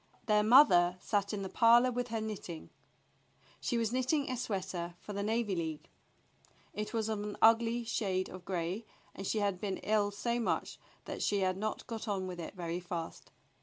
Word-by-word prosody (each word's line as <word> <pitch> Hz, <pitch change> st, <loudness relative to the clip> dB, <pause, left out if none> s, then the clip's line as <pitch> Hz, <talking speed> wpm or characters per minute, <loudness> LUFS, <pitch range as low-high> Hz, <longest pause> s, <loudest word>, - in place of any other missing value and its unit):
Their 210 Hz, -2 st, +4 dB
mother 195 Hz, -7 st, +6 dB
sat 200 Hz, +1 st, 0 dB
in 205 Hz, -2 st, -3 dB
the -, -, -3 dB
parlor 235 Hz, +4 st, +5 dB
with 245 Hz, 0 st, -2 dB
her 225 Hz, -1 st, -2 dB
knitting. 200 Hz, -6 st, -6 dB, 0.9 s
She 240 Hz, -, -1 dB
was 230 Hz, 0 st, 0 dB
knitting 260 Hz, +2 st, +1 dB
a -, -, -1 dB
sweater 185 Hz, -7 st, -3 dB
for 205 Hz, -, -8 dB
the 200 Hz, -, -2 dB
Navy 215 Hz, -1 st, 0 dB
League. 160 Hz, -3 st, -4 dB, 0.8 s
It 210 Hz, +1 st, -4 dB
was 225 Hz, -2 st, -1 dB
of 215 Hz, -2 st, -2 dB
an 210 Hz, 0 st, -5 dB
ugly 230 Hz, +1 st, +4 dB
shade 195 Hz, -5 st, -1 dB
of 185 Hz, -1 st, -10 dB
gray, 185 Hz, +4 st, -3 dB, 0.3 s
and 195 Hz, -, -6 dB
she -, -, 0 dB
had 200 Hz, -3 st, 0 dB
been 195 Hz, -2 st, -2 dB
ill 210 Hz, -1 st, +2 dB
so 235 Hz, +4 st, -2 dB
much 235 Hz, -, -1 dB, 0.3 s
that -, -, -5 dB
she 205 Hz, -1 st, +1 dB
had 185 Hz, -1 st, +1 dB
not 215 Hz, +3 st, -3 dB
got 230 Hz, -1 st, -6 dB
on 195 Hz, -3 st, -1 dB
with 180 Hz, -1 st, -6 dB
it 170 Hz, -, -7 dB
very 170 Hz, -1 st, -3 dB
fast. 175 Hz, -2 st, -6 dB
205 Hz, 190 wpm, -33 LUFS, 185-230 Hz, 0.9 s, mother